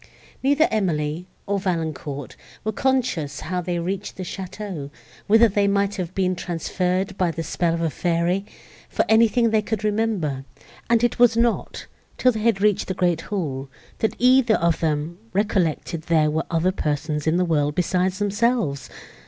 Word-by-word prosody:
Neither 285 +4 +3
Emily, 170 -5 -1 0.2
nor 200 0 0
Valancourt, 160 -6 -3 0.3
were 215 - -1
conscious 215 - 0
how 180 +1 -2
they 175 0 -2
reached 185 +3 -4
the 185 - -4
château, 185 -5 -6 0.4
whither 225 +3 +6
they 205 -1 +1
might 200 0 +1
have 185 -1 -4
been 185 -1 +1
transferred 180 +2 -2
by 180 -2 +2
the 165 0 -4
spell 165 +1 0
of 170 - -3
a 165 -2 0
fairy, 175 +3 0 0.5
for - - +1
anything 230 +1 +4
they 220 -1 +3
could 215 0 -3
remember; 205 -11 0 0.5
and 235 0 +3
it 240 - +1
was 235 -2 +5
not, 235 -1 0 0.3
till 255 - +4
they 220 - -4
had 215 -3 +1
reached 210 -2 +2
the 190 - -3
great 175 -3 +1
hall, 140 -9 -4 0.3
that 220 - 0
either 250 -2 +5
of 170 -1 +1
them 160 +2 -1
recollected 185 -5 0
there 155 -2 +2
were 160 +1 -1
other 170 +2 +1
persons 150 -3 -2
in 160 +2 +3
the 180 - +2
world 150 -3 +1
besides 180 +1 +1
themselves. 205 - 0
185 Hz, 165 wpm, -23 LUFS, 165-215 Hz, 0.5 s, whither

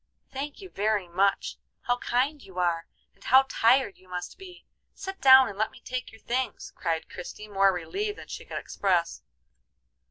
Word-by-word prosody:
"Thank 285 +6 -5
you 380 - -10
very 205 -2 0
much! 195 +3 +1 0.2
How 245 -1 0
kind 270 +5 0
you 190 -5 -14
are, 170 -2 0 0.3
and - - -22
how 265 +2 +6
tired 245 -3 +3
you 185 - -22
must 180 -1 -5
be! 365 -2 -12 0.3
Sit 385 0 -7
down 265 -1 +9
and 200 0 -8
let 220 - +2
me - - -16
take 255 0 -5
your 220 - -16
things," 255 +1 -3
cried 165 -2 -2
Christie, 195 +4 -8
more 195 -1 +4
relieved 395 - -3
than - - -10
she - - -7
could - - -6
express. 180 -4 0
220 Hz, 180 wpm, -27 LUFS, 185-265 Hz, 0.3 s, down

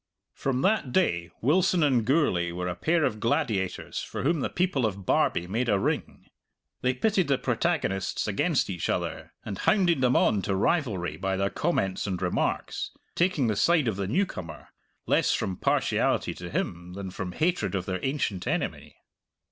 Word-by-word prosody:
From 130 -1 -1
that 190 - +2
day 85 - +1
Wilson 175 +5 +3
and 130 -6 +3
Gourlay 110 - +2
were 90 +1 -3
a 90 - -1
pair 160 - +1
of 110 -6 0
gladiators 115 - -1
for - - -5
whom 160 +3 +2
the - - -1
people 175 -7 0
of 100 -2 -6
Barbie 85 - +2
made 115 +7 -1
a 100 - +4
ring. - - -2 0.6
They 130 0 +1
pitted 195 +4 +1
the 140 -2 +2
protagonists 125 - -1
against 145 - +1
each 90 -3 -3
other - - -2
and 100 -3 -5
hounded 175 -8 +3
them 125 -1 +3
on 100 - +3
to 95 - -1
rivalry 95 - 0
by 95 +2 -1
their 100 +1 0
comments 100 - -1
and 95 -2 -2
remarks, 90 -1 -1 0.2
taking 170 -6 +2
the 110 -2 +1
side 165 - +3
of 110 - 0
the 100 -1 -2
newcomer, 105 - -3 0.4
less - - +3
from 95 - -1
partiality - - +1
to - - -8
him 90 0 -3
than 95 -1 -6
from 90 -1 -5
hatred 170 - 0
of 95 -2 -2
their 95 -1 -2
ancient 135 -9 -1
enemy. - - -2
115 Hz, 170 wpm, -27 LUFS, 95-155 Hz, 0.6 s, a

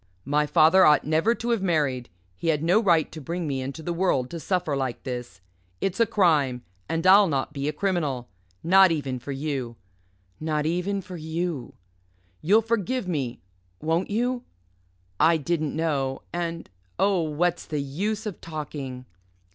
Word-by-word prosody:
My 150 +2 +1
father 160 +5 +6
ought 150 -3 +5
never 160 +10 +2
to 235 +1 -3
have 230 -4 +1
married. 145 -9 0 0.3
He 90 - -5
had 155 -2 +1
no 180 +7 +4
right 170 -7 +3
to 155 - -8
bring 170 +5 -3
me 135 -3 -2
into 140 +5 -6
the 175 - -2
world 165 -8 0
to 170 - -5
suffer 175 -4 -1
like 130 -3 -3
this. 125 -6 -6 0.4
It's 195 +1 -2
a 230 - +4
crime. 150 - +2 0.3
And 165 +2 -1
I'll 195 +2 +7
not 140 -2 -1
be 140 -1 -3
a - - 0
criminal. 150 -8 -1 0.4
Not 190 +1 +6
even 140 -5 -2
for 130 +4 -7
you 135 -4 -3 0.6
not 155 -1 -1
even 180 +4 -1
for 180 0 -8
you. 160 -4 -4 0.7
You'll 210 +7 +4
forgive 230 0 -1
me 135 - -3 0.4
won't 165 +3 0
you? 245 +4 -1 0.8
I 165 +2 +5
didn't 155 -1 -1
know 140 -5 -1
and 170 -1 -3 0.3
oh, 195 -3 +2
what's 160 +2 -1
the 150 - -3
use 200 +11 -2
of 210 -4 -6
talking?" 145 -5 -6
160 Hz, 165 wpm, -25 LUFS, 140-185 Hz, 0.8 s, I'll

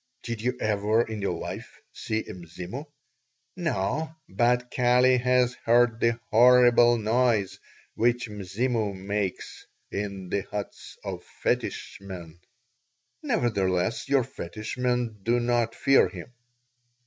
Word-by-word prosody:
"Did 115 -2 -4
you 125 +2 -1
ever 110 +2 +2
in 110 -2 -6
your 100 - -1
life - - -7
see 110 0 -2
a 110 - -8
Mzimu?" 90 - -8 0.7
"No, 155 - -2
but 125 +5 +1
Kali 125 +1 +4
has 125 0 +2
heard 120 -1 +4
the 115 0 +1
horrible 120 0 +6
noise 110 -2 +1 0.3
which 120 +1 +1
Mzimu 105 +1 -2
makes 100 0 -4 0.2
in 100 -2 -4
the 100 - 0
huts 100 +1 -7
of - - -5 0.2
fetish - - -1
men." 85 -4 -9 0.8
"Nevertheless 100 -1 0
your 140 -2 +4
fetish 110 0 -7
men 125 -3 -1
do 120 +4 +2
not 120 -1 0
fear 135 0 +4
him." 125 - -10
115 Hz, 120 wpm, -26 LUFS, 100-125 Hz, 0.8 s, horrible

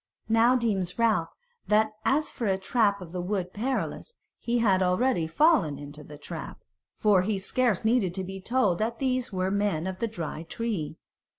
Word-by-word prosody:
Now 230 +3 +5
deems 200 -7 -1
Ralph 220 -8 +2 0.4
that 215 +1 +3
as 295 +2 +2
for 230 - -3
a 190 -1 +2
trap 200 0 +1
of 165 - -11
the 180 0 -3
Wood 185 -1 -2
Perilous, 260 - -3 0.3
he 240 0 0
had 195 -5 +3
already 185 0 +2
fallen 170 - +3
into 145 +1 -9
the 150 0 -11
trap; 145 - -8 0.4
for 205 -4 +4
he 205 +2 -1
scarce 225 +1 +1
needed 220 -6 +2
to 190 - -3
be 190 +1 -7
told 210 -5 +1
that 230 +2 -1
these 255 -2 -1
were 185 0 -1
men 200 -5 0
of 190 0 -4
the 230 - 0
Dry 165 -7 -5
Tree. 170 -3 -4
200 Hz, 180 wpm, -27 LUFS, 180-235 Hz, 0.4 s, Now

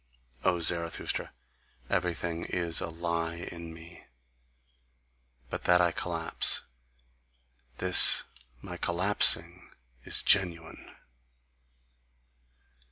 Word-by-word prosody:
O 90 - +1
Zarathustra, 85 0 0 0.6
everything 85 -1 -4
is 85 -1 -2
a 90 - -5
lie 85 0 -4
in 85 -1 -10
me; 85 +1 -14 1.4
but - - -7
that 90 0 +3
I 85 -1 +1
collapse 85 0 0 1.1
this - - +5 0.4
my - - -9
collapsing 90 -1 +3 0.3
is - - -3
GENUINE!" 85 -4 0
85 Hz, 80 wpm, -27 LUFS, 85-90 Hz, 1.4 s, this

